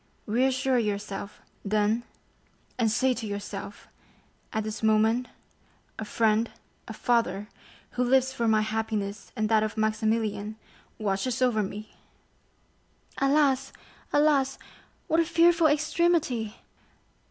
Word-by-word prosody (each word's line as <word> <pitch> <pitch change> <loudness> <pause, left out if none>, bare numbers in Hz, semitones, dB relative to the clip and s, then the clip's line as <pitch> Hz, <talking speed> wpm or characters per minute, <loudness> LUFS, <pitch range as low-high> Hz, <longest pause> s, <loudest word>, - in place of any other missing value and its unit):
Reassure 260 +3 +2
yourself, 205 -1 -4 0.2
then, 210 +2 +1 0.8
and 225 -2 +3
say 255 +4 +2
to 230 -3 -5
yourself: 200 0 -6 0.6
'At 220 - -1
this 215 0 -5
moment, 220 +3 +3 0.7
a 220 - -3
friend, 220 +1 +2 0.4
a 225 - -6
father, 225 -3 0 0.4
who 250 - 0
lives 260 +1 +3
for 235 -3 -1
my 215 -1 +4
happiness 215 -2 -3
and 215 -2 0
that 220 -1 +4
of 215 0 -2
Maximilian, 215 -1 0 0.4
watches 215 +4 -1
over 245 -4 +2
me!'" 210 +2 -6 1.3
"Alas, 275 -1 +2 0.4
alas, 290 -2 +3 0.5
what 320 - +2
a - - +5
fearful 335 0 +4
extremity!" 305 - +1
225 Hz, 110 wpm, -27 LUFS, 215-260 Hz, 1.3 s, a